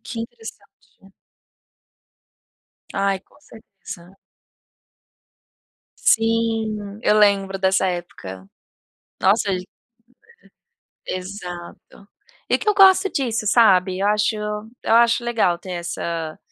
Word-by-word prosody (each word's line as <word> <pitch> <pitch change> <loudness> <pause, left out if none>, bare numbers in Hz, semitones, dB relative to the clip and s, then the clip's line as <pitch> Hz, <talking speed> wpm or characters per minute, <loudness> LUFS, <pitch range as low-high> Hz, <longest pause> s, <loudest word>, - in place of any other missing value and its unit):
Que 230 0 -7
interessante. 225 -3 -9 0.4
Hum. 195 0 -19 1.8
Ai, 195 -1 0
com - - -26
certeza. 195 - -13 1.8
Sim! 225 -2 0
Eu 215 - +3
lembro 195 -2 +3
dessa 190 0 +2
época. 95 - -6 0.7
Nó 190 +2 +5
sei. 200 -4 -1 1.3
Uhum. - - -7
Aham. 180 -2 -8 0.2
Exato. 200 - -18 0.4
E - - +2
que - - -3
eu 420 - +4
gosto 390 0 +6
disso, 240 -5 -2
sabe? 190 -5 +4
Eu 200 - +1
acho 210 +1 +1 0.5
eu - - +2
acho 235 0 +4
legal 220 -8 +1
ter 185 +2 -10
essa, 170 -2 -4
200 Hz, 105 wpm, -21 LUFS, 185-225 Hz, 1.8 s, gosto